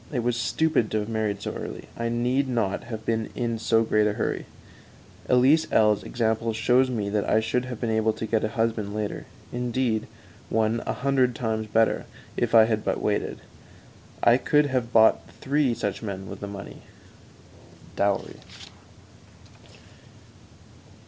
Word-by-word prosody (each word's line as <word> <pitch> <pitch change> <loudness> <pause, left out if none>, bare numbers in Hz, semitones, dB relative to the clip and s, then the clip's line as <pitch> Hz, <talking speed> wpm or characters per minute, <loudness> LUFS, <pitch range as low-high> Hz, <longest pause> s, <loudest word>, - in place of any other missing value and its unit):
It 125 -5 -1
was 120 0 +1
stupid 120 0 +1
to 110 - 0
have 105 - -6
married 105 -2 -2
so - - -3
early; - - -7
I 115 0 -2
need 125 +4 0
not 115 -6 -1
have 110 -2 -7
been 110 -1 -1
in 115 -2 -2
so 115 0 +3
great 105 -1 +2
a 105 - 0
hurry. 110 - -3 0.8
Elise 135 +6 +4
L 105 -1 +5
's - - -11
example 115 -1 -1
shows 125 +4 +3
me 110 -5 -2
that 105 -1 0
I 110 - +4
should 115 +3 -1
have 125 -3 -6
been 115 - -1
able 110 0 +2
to 110 - -5
get 110 0 0
a - - +2
husband 110 -2 -2
later; 105 -1 -4 0.3
indeed, 120 -2 -1 0.4
one 110 +1 +1
a - - 0
hundred 130 -2 +1
times 110 -2 -2
better 110 +1 +1 0.3
if - - 0
I 110 - +9
had 110 -1 -1
but - - -1
waited. - - -2 0.8
I 120 +1 +6
could 150 +2 +3
have 120 -2 -1
bought 110 -1 +5 0.2
three 140 -3 +1
such 120 - -3
men 95 -3 -5
with - - -8
the 100 - -6
money 100 0 -9 1.1
(dowry). 100 0 0
115 Hz, 160 wpm, -25 LUFS, 110-125 Hz, 1.1 s, I